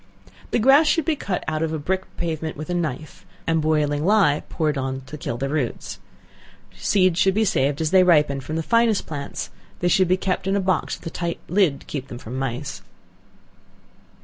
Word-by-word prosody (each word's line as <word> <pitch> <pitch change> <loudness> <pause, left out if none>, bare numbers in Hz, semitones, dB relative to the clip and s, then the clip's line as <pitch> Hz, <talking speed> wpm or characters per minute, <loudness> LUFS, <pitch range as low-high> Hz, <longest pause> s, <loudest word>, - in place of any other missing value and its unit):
The - - +1
grass 270 +7 +6
should 325 -1 +2
be 320 - +1
cut 195 -9 -3
out 155 0 -1
of 160 -1 0
a - - -1
brick 190 +5 -2
pavement 160 -2 -3
with 155 +4 -5
a - - 0
knife, 155 -4 -4 0.2
and 165 -1 +1
boiling 150 -1 +1
ley 185 -6 +4
poured 155 -2 0
on 135 -1 -3
to 135 +3 -10
kill 125 -5 -4
the 135 +2 -2
roots. 140 -4 -3 0.8
Seeds 180 - +2
should 190 0 +3
be 220 +1 +3
saved 145 -7 +1
as 160 0 0
they 190 -1 +6
ripen, 150 -6 +3
from 155 +4 -5
the 165 - -1
finest 230 +1 +2
plants; 145 -3 -5 0.3
they 175 - 0
should 185 +1 +4
be 185 +2 +3
kept 185 0 -2
in 195 - +1
a - - +2
box 185 -3 0
with - - -18
a 165 - -4
tight 170 0 -3
lid 175 -6 +2
to - - -16
keep 135 -2 -5
them 120 - -8
from 120 0 -8
mice. 135 +2 -4
160 Hz, 205 wpm, -23 LUFS, 145-190 Hz, 0.8 s, grass